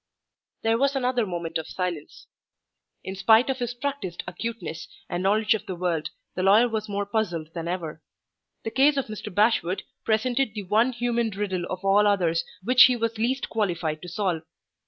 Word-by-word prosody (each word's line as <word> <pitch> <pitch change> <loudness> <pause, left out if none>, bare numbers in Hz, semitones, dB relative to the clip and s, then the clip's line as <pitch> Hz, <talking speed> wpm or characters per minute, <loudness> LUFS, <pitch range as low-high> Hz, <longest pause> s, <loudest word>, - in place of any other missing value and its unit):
There 225 +1 +2
was 275 +1 +2
another 250 -4 +1
moment 170 -2 -3
of 160 - -7
silence. 175 -5 -5 0.8
In 190 - -5
spite 225 +6 +5
of 265 - -4
his 245 -1 -3
practiced 250 -9 -4
acuteness 230 -8 -5 0.2
and 175 - -3
knowledge 210 +3 +3
of 215 -1 -4
the 185 - -3
world, 170 -3 -1 0.2
the 185 - -3
lawyer 205 +6 +6
was 220 -2 -3
more 200 0 -1
puzzled 175 -7 -2
than 170 -1 -4
ever. 165 -3 -4 0.6
The 225 - -3
case 280 +3 +4
of 275 - 0
Mr. 215 -1 -7
Bashwood 205 -2 +2 0.2
presented 235 +2 +1
the 210 - -4
one 220 +7 +3
human 235 -1 0
riddle 195 -3 -2
of 185 +1 -5
all 205 +2 +5
others 170 -5 +2 0.2
which 250 +4 +8
he 255 - +3
was 230 -1 -2
least 255 +4 0
qualified 170 -8 -1
to 180 - -8
solve. 175 -2 -1
210 Hz, 180 wpm, -25 LUFS, 180-235 Hz, 0.8 s, which